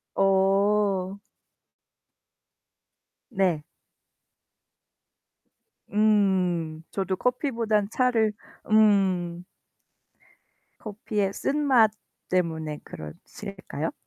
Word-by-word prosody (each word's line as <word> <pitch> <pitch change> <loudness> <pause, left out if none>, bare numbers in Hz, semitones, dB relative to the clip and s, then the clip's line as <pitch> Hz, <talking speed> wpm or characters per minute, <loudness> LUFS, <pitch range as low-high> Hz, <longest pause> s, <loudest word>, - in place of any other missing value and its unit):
어. 195 0 +2 2.1
네. 185 -8 +1 2.3
음. 190 -6 +1
저도 190 -1 -1
커피보단 230 -5 0
차를 235 -4 +2 0.4
음. 190 -5 +3 1.4
커피의 205 -2 -3
쓴맛 265 -7 +3 0.4
때문에 160 -4 -1
그러실까요? 155 - -7
195 Hz, 105 characters per minute, -26 LUFS, 180-215 Hz, 2.3 s, 음